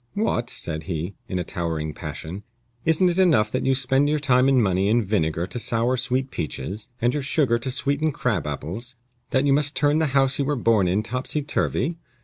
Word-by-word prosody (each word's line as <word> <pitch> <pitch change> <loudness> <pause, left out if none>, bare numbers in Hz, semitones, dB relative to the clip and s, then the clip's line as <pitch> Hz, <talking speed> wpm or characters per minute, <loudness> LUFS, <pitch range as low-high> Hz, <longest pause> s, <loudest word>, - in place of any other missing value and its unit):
"What!" 160 - 0
said 80 -1 -4
he, 85 +2 -3
in 95 - -3
a 90 - -1
towering 80 -4 -3
passion, 80 +5 -7 0.4
"isn't 165 +3 +4
it 175 +1 +1
enough 145 - +4
that - - -1
you 135 - +4
spend 135 +2 +2
your 155 - +2
time 130 -2 +3
and 135 - +4
money 95 -4 +2
in 115 0 +2
vinegar 85 -4 0
to 120 - -5
sour 115 +2 +1
sweet 130 +1 -1
peaches, 95 +8 -4
and 120 +1 +1
your 150 - -1
sugar 130 -4 +2
to 130 - -3
sweeten 140 +4 0
crab 110 - -1
apples, 95 - -5 0.3
that 135 0 +2
you 140 - +4
must 145 +1 +2
turn 145 +1 +2
the 160 - +2
house 135 0 +2
you 140 - +1
were 145 +1 0
born 115 -6 +2
in 95 +4 +1
topsy 125 +6 -2
turvy? 155 +2 -1
125 Hz, 205 wpm, -24 LUFS, 95-140 Hz, 0.4 s, isn't